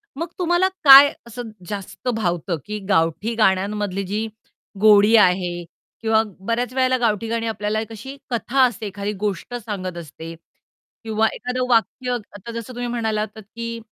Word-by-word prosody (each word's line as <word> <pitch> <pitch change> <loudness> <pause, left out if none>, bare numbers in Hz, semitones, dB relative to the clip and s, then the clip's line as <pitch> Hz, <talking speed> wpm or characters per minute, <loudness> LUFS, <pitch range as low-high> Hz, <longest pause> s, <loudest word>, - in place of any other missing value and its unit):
मग 335 +4 -3
तुम्हाला 350 +1 +2 0.2
काय 280 +1 +10 0.2
असं 235 0 -7 0.2
जास्त 205 +4 -7
भावतं? 175 -4 -1
की 210 0 -5
गावठी 165 +6 +1
गाण्यांमधली 200 -1 +1
जी 215 +3 -2 0.5
गोडी 210 +1 +6
आहे 180 -3 +3 0.4
किंवा 220 -1 +3 0.2
बऱ्याच 235 +5 -2
वेळेला 255 -1 +2
गावठी 225 -2 0
गाणी 230 0 -2
आपल्याला 215 -1 -2
एक 225 - -8
अशी 265 +6 -9
कथा 245 +2 +1
असते 235 -4 0
एखादी 200 +1 -4
गोष्ट 205 +3 -3
सांगत 195 -6 -5
असते 165 0 -9 0.7
किंवा 220 0 +1
एखादं 250 0 -3
वाक्य 250 +2 +1 0.2
आता 220 +4 -8
जसं 230 +2 -7
तुम्ही 245 0 -4
म्हणाला 220 -3 -1
होतात 215 0 -6
की 230 0 -5
220 Hz, 150 wpm, -21 LUFS, 200-240 Hz, 0.7 s, काय